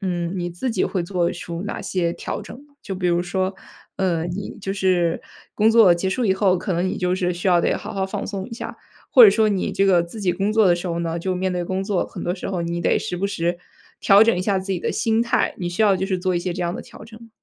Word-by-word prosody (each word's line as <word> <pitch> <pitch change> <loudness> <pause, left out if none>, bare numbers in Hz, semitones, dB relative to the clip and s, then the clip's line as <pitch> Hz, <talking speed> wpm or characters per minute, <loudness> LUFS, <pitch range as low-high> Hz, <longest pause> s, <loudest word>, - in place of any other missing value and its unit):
嗯， 175 -3 -2
你 175 -1 -3
自 175 +9 -3
己 215 -5 0
会 185 -3 -2
做 175 -1 0
出 170 0 -6
哪 210 - -5
些 170 -2 -1
调 - - -5
整 - - -10
呢？ 285 - -29
就 195 - -5
比 180 -1 -2
如 175 0 +2
说， 190 +1 -2 0.4
呃， 175 -4 0
你 185 +3 -5
就 195 0 -3
是 180 -4 +1 0.3
工 215 +1 +4
作 220 -6 +6
结 190 +2 -2
束 245 +5 -1
以 190 - +3
后， 190 -2 +2
可 190 - -3
能 175 +2 0
你 - - -2
就 180 0 0
是 180 -1 0
需 180 +2 -2
要 175 -1 +4
得 - - +1
好 - - -7
好 195 -1 -1
放 - - -4
松 195 -2 -5
一 - - -12
下。 - - -7 0.4
或 - - +10
者 - - +10
说 220 -1 +2
你 195 -2 -1
这 195 - +2
个 180 -3 +4
自 200 +5 -8
己 180 - +2
工 195 +4 -1
作 220 -2 +4
的 175 - +5
时 175 +2 -5
候 170 -1 -2
呢， 165 0 -2
就 185 +2 -2
面 185 0 -1
对 175 -1 -2
工 190 +2 -2
作， 200 -3 0
很 - - -8
多 175 - -1
时 - - -6
候 180 -3 -2
你 170 0 -3
得 - - +2
时 220 - -4
不 185 +3 -1
时 175 -3 -2 0.4
调 200 +2 +6
整 230 - +3
一 180 - -2
下 195 0 +1
自 190 +1 -3
己 175 - -2
的 - - -1
心 225 0 +1
态， 235 - 0
你 175 -2 -3
需 175 +5 -1
要 205 -2 +5
就 190 +1 -2
是 190 -2 -1
做 185 0 -1
一 - - +1
些 180 +1 -3
这 180 - -3
样 170 0 -2
的 - - -5
调 215 - -13
整 225 0 -14
吗？ 230 - -14
185 Hz, 315 characters per minute, -22 LUFS, 175-200 Hz, 0.4 s, 或